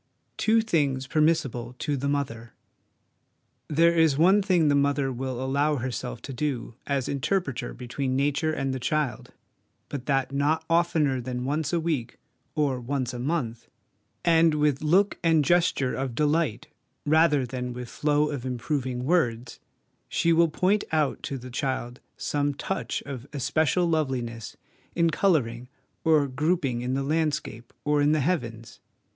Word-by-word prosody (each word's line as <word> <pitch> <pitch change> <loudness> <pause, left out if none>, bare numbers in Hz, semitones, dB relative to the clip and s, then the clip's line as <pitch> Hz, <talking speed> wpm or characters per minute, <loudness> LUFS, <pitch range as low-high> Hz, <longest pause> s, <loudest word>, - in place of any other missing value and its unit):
l - - -46
Two 225 +1 +3
Things 145 -11 0
permissible 135 -6 0
to 145 +1 -1
the 140 +1 -2
Mother. 120 -5 -3 1.1
There 165 +3 +4
is 160 -4 +4
one 190 +6 +5
thing 180 -5 +3
the 145 - +4
mother 140 -1 +2
will 130 0 -4
allow 140 +3 +1
herself 125 -2 -4
to 135 - -6
do 130 -3 -3
as 140 -2 0
interpreter 140 -1 -1
between 130 +2 -3
Nature 145 +3 +1
and 135 -3 -2
the 130 - -3
child, 145 -3 -2 0.6
but 140 -3 -6
that 135 -2 +1
not 150 +3 +1
oftener 160 -6 +2
than 125 0 -4
once 150 +2 -1
a 170 - +1
week 150 -8 -2 0.4
or 140 -4 +1
once 130 0 -2
a 120 - -5
month, 125 -4 -2 0.6
and 165 -2 +5
with 150 -2 +1
look 185 +7 +2
and 160 -3 +3
gesture 165 -6 +2
of 130 -3 -3
delight 150 -3 +1 0.4
rather 150 -2 +4
than 125 0 -4
with 125 0 -6
flow 150 +3 +1
of 140 -4 -4
improving 130 0 -2
words 125 -8 0 0.5
she 170 - +2
will 165 0 +4
point 190 +6 +1
out 155 -3 +1
to 140 - -4
the 125 0 -10
child 130 -2 -3 0.2
some 145 -1 -1
touch 190 +6 -3
of 135 -2 -7
especial 155 +5 +1
loveliness 130 -9 -2 0.4
in 170 -1 +3
colouring 125 -10 +1 0.3
or 155 -3 +4
grouping 140 -2 0
in 125 +1 -1
the 135 - -1
landscape 150 -6 -2
or 150 0 +2
in 145 +1 +4
the 155 - +2
heavens. 115 -8 -3
140 Hz, 150 wpm, -26 LUFS, 130-160 Hz, 1.1 s, one